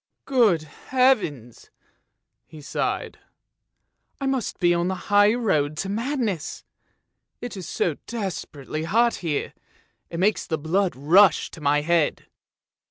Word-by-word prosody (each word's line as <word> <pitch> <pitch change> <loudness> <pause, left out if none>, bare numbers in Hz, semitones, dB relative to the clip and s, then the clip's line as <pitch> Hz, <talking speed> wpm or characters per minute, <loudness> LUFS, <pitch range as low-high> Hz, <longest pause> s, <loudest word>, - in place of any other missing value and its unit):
" - - -57
Good 225 - +3
heavens! 160 - 0 0.4
" - - -54 0.3
he 155 - -12
sighed, 145 - -3 0.5
" - - -49
I 275 - -3
must 270 -4 -1
be 175 -1 +4
on 170 0 0
the 190 - -1
high 205 +3 +3
road 155 -11 0
to 195 - -3
madness! 225 - -2 0.8
It 245 -2 -6
is 185 -4 -7
so 160 -5 -1
desperately 160 - -5
hot 230 +7 +2
here, 160 -5 -3 0.6
it 170 - -5
makes 205 +3 +1
the 160 - -1
blood 175 +3 0
rush 165 +6 +4
to 160 - -11
my 145 0 +2
head! 165 -1 +1
180 Hz, 140 wpm, -24 LUFS, 155-220 Hz, 0.8 s, be